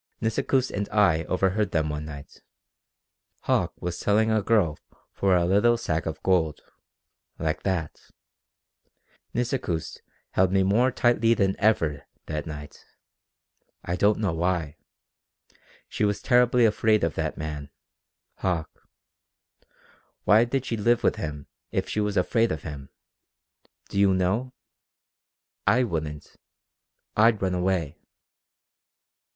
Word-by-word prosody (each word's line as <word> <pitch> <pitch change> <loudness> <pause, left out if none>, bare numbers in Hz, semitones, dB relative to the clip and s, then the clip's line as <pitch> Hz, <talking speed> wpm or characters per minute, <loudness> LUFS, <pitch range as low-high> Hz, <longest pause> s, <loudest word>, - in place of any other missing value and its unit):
"Nisikoos 125 +3 0
and 100 0 -3
I 90 -7 +3
overheard 95 +3 0
them 80 -1 +1
one 75 0 -4
night. 70 -2 -10 1.0
Hauck - - 0
was 90 0 -3
selling 110 +2 +2
a 110 -1 +2
girl 100 -8 +1 0.3
for 95 -2 +2
a 85 -1 +2
little 105 +6 +3
sack 80 -9 -2
of 80 - -5
gold 85 -5 +1 0.8
like 80 -1 -2
that. 90 -6 -3 1.3
Nisikoos 120 - -2 0.3
held 95 0 +2
me 95 0 +3
more 110 +7 +3
tightly 120 -2 +3
than 95 -2 +1
ever, 80 -9 +1 0.2
that 75 -1 -4
night. 75 -2 -9 1.0
I 85 - -1
don't 100 +3 +3
know 100 -6 -1
why. 85 -3 -1 1.1
She - - -3
was 105 -1 +1
terribly 125 -1 +4
afraid 110 -1 +2
of 85 - +1
that 80 -1 -3
man 75 -2 -5 0.7
Hauck. 85 -4 -1 1.5
Why 110 +3 +5
did 135 +2 -2
she 115 - -2
live 120 +3 +2
with - - +2
him 75 -8 -5 0.2
if - - -2
she - - -2
was 105 -1 -1
afraid 115 0 +2
of 80 - -4
him? 70 -3 -8 1.0
Do 100 - -2
you 100 -2 +4
know? 105 +8 -1 1.1
I 125 +2 +4
wouldn't. 80 -8 -5 0.8
I'd 110 0 +4
run 95 -1 -1
away." 90 -4 -1
95 Hz, 125 wpm, -26 LUFS, 80-110 Hz, 1.5 s, Why